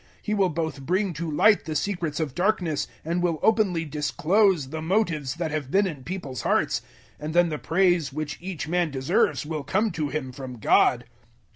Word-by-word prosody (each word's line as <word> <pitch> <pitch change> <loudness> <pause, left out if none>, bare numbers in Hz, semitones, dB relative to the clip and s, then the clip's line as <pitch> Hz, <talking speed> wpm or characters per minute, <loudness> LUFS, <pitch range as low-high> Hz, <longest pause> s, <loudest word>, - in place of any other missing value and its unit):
He 210 - -3
will 195 -3 +2
both 160 -3 -3
bring 185 +6 0
to 165 +1 -4
light 200 +8 +4
the 155 -2 -4
secrets 170 -2 -2
of 155 -5 -2
darkness 175 -5 0 0.2
and 170 +2 0
will 170 -3 0
openly 205 -7 +2
disclose 155 +2 +1
the 160 +2 -5
motives 160 -6 0
that 165 -2 -3
have 150 -4 -3
been 200 +6 +3
in 150 -8 -5
people's 145 -7 -5
hearts; - - +1 0.4
and 155 +2 -5
then 175 -1 +5
the 150 -2 -3
praise 175 -4 +2
which 150 0 -4
each 170 -6 -5
man 175 0 +1
deserves 135 +1 +1
will 155 -1 -4
come 210 +7 +1
to 155 -3 -2
him 140 -4 -3
from 130 -1 -8
God. 110 - +3
160 Hz, 185 wpm, -25 LUFS, 150-185 Hz, 0.4 s, then